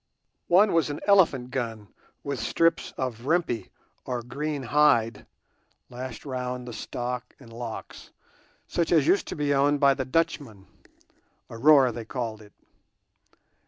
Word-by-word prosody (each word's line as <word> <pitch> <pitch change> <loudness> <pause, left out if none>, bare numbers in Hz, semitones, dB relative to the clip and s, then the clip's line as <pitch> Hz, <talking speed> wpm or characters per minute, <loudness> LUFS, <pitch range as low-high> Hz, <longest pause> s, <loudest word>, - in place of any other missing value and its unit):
One 195 +4 +5
was 165 -2 +2
an 145 - -4
elephant 160 -11 +3
gun 115 -5 -4 0.3
with 140 -3 -3
strips 165 +9 +1
of 125 -1 -4
rimpi, 150 - 0 0.3
or 125 -2 -4
green 145 +3 -4
hide, 130 -4 +2 0.6
lashed 125 +1 -7
round 125 -2 -4
the 120 - -7
stock 125 +2 -5
and 115 -4 -14
locks, 115 -1 -8 0.6
such 170 -2 -1
as 160 -5 +4
used 195 - +2
to - - -5
be 145 -1 0
owned 140 +1 +2
by 140 -1 +5
the 135 - -3
Dutchmen—a 125 - -5
"roer" 135 +1 +5
they 115 -1 -7
call 115 -3 -4
it. 105 -1 -17
130 Hz, 135 wpm, -26 LUFS, 120-150 Hz, 0.6 s, One